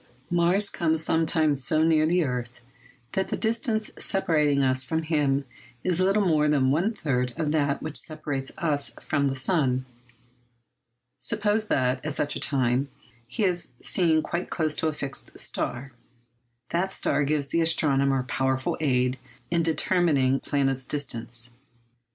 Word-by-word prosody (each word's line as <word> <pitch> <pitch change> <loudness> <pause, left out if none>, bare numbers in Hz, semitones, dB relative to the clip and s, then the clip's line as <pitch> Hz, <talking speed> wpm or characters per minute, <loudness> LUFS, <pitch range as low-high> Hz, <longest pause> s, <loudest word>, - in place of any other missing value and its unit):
Mars 175 +4 +3
comes 160 -1 0
sometimes 160 -4 +2
so 155 +5 +2
near 155 -1 +3
the 175 +1 +2
earth 125 -3 -4 0.5
that 190 - -1
the - - -2
distance 220 -1 0
separating 150 -7 +1
us 130 0 +2
from 160 +5 -2
him 145 -3 0 0.4
is 180 -1 0
little 195 +2 +2
more 155 -4 +2
than 135 -3 +2
one 175 +10 +1
third 125 - -2
of 155 -3 -1
that 145 -2 0
which 155 -1 -1
separates 145 -4 -5
us 145 -4 0
from 140 -1 0
the 135 - -2
sun. 130 -2 +1 1.3
Suppose 210 - +1
that, 130 -5 0
at 150 -1 -3
such 145 - -1
a - - -3
time, 130 0 0 0.4
he 210 - -3
is 175 -8 0
seen 160 -4 +2
quite 170 +1 -4
close 155 -3 -1
to 160 - 0
a 155 - -1
fixed 140 -2 -6
star. 130 +3 -3 0.8
That 185 +3 0
star 145 - +1
gives 145 -1 -1
the 165 - +1
astronomer 140 -5 +3
powerful 130 +1 -1
aid 125 -3 +1 0.3
in 170 -1 +2
determining 160 -4 +2
the - - -13
planet's 135 -2 0
distance. 120 -4 -2
150 Hz, 150 wpm, -25 LUFS, 135-165 Hz, 1.3 s, Mars